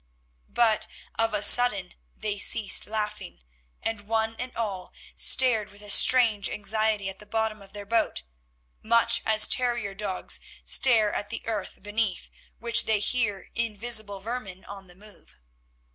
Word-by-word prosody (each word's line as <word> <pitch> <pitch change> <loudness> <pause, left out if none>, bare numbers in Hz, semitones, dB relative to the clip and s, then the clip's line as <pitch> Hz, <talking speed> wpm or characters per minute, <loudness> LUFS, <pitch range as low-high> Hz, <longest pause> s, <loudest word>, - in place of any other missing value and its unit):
But 225 -3 +2 0.3
of 225 0 0
a 205 - -1
sudden 205 -5 +3 0.2
they 210 -2 -3
ceased 210 0 +1
laughing, 210 - -5 0.4
and 205 -2 -4
one 225 0 0
and 250 0 -5
all 200 -5 -4 0.2
stared 235 -6 +2
with 205 +1 -13
a 205 - -2
strange 225 -6 +6
anxiety 215 0 0
at 190 0 -7
the 210 - -13
bottom 220 -1 -2
of 195 0 -16
their 205 -1 -7
boat, 225 - 0 0.6
much 230 +1 +3
as 215 -1 +6
terrier 240 -5 0
dogs 195 -2 -2 0.2
stare 225 -5 +3
at 205 - -3
the 230 - -6
earth 210 -4 -5
beneath 205 -2 -3 0.3
which 235 0 +3
they 220 -1 +2
hear 205 -3 -1
invisible 215 -2 -2
vermin 205 -4 -7
on 195 -1 -10
the 180 - -15
move. 210 +2 -15
215 Hz, 145 wpm, -26 LUFS, 205-230 Hz, 0.6 s, strange